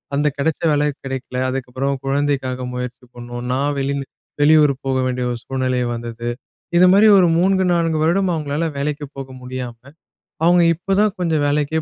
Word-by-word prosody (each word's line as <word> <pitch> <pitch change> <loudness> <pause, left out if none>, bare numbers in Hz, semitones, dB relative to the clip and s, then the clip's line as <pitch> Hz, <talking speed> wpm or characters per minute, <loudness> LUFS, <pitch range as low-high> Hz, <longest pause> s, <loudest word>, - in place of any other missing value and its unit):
அந்த 145 +1 +2
கிடைச்ச 155 +2 -1
வேலை 150 0 +2 0.2
கிடைக்கல. 130 -1 -5
அதுக்கப்புறம் 135 +1 -2
குழந்தைக்காக 135 -2 -1
முயற்சி 125 0 -6
பண்ணோம். 120 0 -7
நான் 140 +2 0
வெளி 140 +1 -1 0.5
வெளியூர் 150 -1 +6
போக 130 -1 0
வேண்டிய 125 -1 -1
ஒரு 120 - -3
சூழ்நிலை 130 -1 -1 0.2
வந்தது, 120 0 -5 0.5
இதுமாரி 185 +4 +6
ஒரு 180 - +5
3 190 +1 +2
4 165 -2 +1
வருடம் 185 +3 +2
அவங்களால 150 0 -2
வேலைக்கு 145 +1 -2
போக 135 -1 -6
முடியாம, 125 -2 -6 0.7
அவங்க 175 0 +5
இப்போ 175 +4 -3
தான் 210 -1 +1
கொஞ்சம் 160 -4 +1
வேலைக்கே 150 +2 0
140 Hz, 150 wpm, -20 LUFS, 130-160 Hz, 0.7 s, வெளியூர்